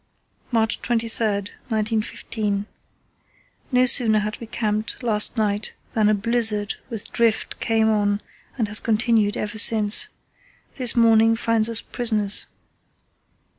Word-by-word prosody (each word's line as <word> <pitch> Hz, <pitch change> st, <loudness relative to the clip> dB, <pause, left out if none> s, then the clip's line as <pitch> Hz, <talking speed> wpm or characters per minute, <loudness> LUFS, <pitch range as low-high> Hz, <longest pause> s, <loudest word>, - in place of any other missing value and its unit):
"March 225 Hz, -2 st, 0 dB
23, 230 Hz, 0 st, -1 dB, 0.5 s
1915.—No 220 Hz, +3 st, -4 dB
sooner 235 Hz, -3 st, +5 dB
had 210 Hz, +1 st, -3 dB
we 230 Hz, -, -8 dB
camped 215 Hz, +1 st, -4 dB
last 215 Hz, 0 st, +3 dB
night 210 Hz, -1 st, -2 dB, 0.2 s
than 215 Hz, -2 st, +1 dB
a 215 Hz, -, +2 dB
blizzard 220 Hz, -1 st, +1 dB, 0.2 s
with 225 Hz, -4 st, -5 dB
drift 230 Hz, -2 st, -1 dB
came 225 Hz, -1 st, +1 dB
on 205 Hz, -2 st, 0 dB, 0.4 s
and 225 Hz, -4 st, -1 dB
has 215 Hz, +1 st, +2 dB
continued 220 Hz, -2 st, 0 dB
ever 210 Hz, +1 st, -3 dB
since. 210 Hz, -1 st, +4 dB, 0.7 s
This 250 Hz, -3 st, +1 dB
morning 225 Hz, -1 st, +4 dB
finds 225 Hz, -1 st, +1 dB
us 230 Hz, -1 st, +2 dB
prisoners. 215 Hz, -4 st, 0 dB
220 Hz, 115 wpm, -21 LUFS, 210-230 Hz, 0.7 s, sooner